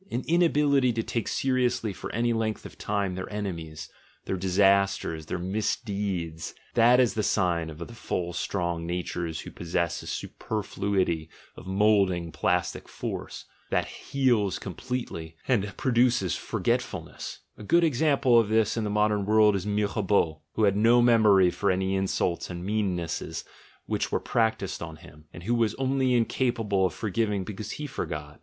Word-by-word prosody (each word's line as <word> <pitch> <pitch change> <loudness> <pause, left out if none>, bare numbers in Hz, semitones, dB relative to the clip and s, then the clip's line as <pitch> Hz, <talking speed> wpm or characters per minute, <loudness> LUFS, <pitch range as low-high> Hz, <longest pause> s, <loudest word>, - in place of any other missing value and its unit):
An 125 +2 -2
inability 150 -6 +3
to 115 0 -1
take 115 0 -2
seriously 125 -5 0
for - - -7
any 120 +1 +1
length 110 -1 -2
of - - -9
time 100 -2 -1
their 95 +2 -6
enemies, 85 -7 -5 0.4
their - - -1
disasters, 95 -3 +2
their - - -2
misdeeds— 95 -4 -2 0.2
that 120 +2 +6
is 120 -6 +3
the 110 - 0
sign 90 -5 +1
of 75 - -9
the 85 - -6
full 90 -6 -3
strong 85 -2 -2
natures 85 -2 -3
who - - -9
possess 85 0 -2
a - - -11
superfluity 95 -6 -2 0.3
of 90 - -11
moulding 95 -4 +2
plastic - - -1
force, - - -6 0.2
that - - +1
heals 120 -9 0
completely 90 -5 -5
and 105 -6 +1
pro 130 - 0
duces 120 -7 +3
forgetfulness: - - -3
a - - -13
good 170 +11 +4
example 140 -4 +4
of 110 -3 +1
this 110 -1 +2
in 115 - -1
the 105 - -1
modern 105 0 +2
world 105 0 +4
is 95 +1 -3
Mirabeau, 100 -6 +1
who 110 - 0
had 100 -2 +4
no 115 +3 +5
memory 105 -6 +5
for 100 - 0
any 95 +1 +1
insults 95 -2 -1
and 90 0 -6
meannesses 95 -6 -2 0.4
which - - -2
were - - +1
practised 110 -4 0
on 80 -1 -6
him, 75 -2 -16
and 85 - -10
who 115 +6 0
was 115 -3 +1
only 130 -1 +1
incapable 115 -5 +1
of - - -7
forgiving 105 -2 -1
because 105 +2 -6
he 150 - -5
forgot. 75 - -5
100 Hz, 160 wpm, -27 LUFS, 90-115 Hz, 0.4 s, that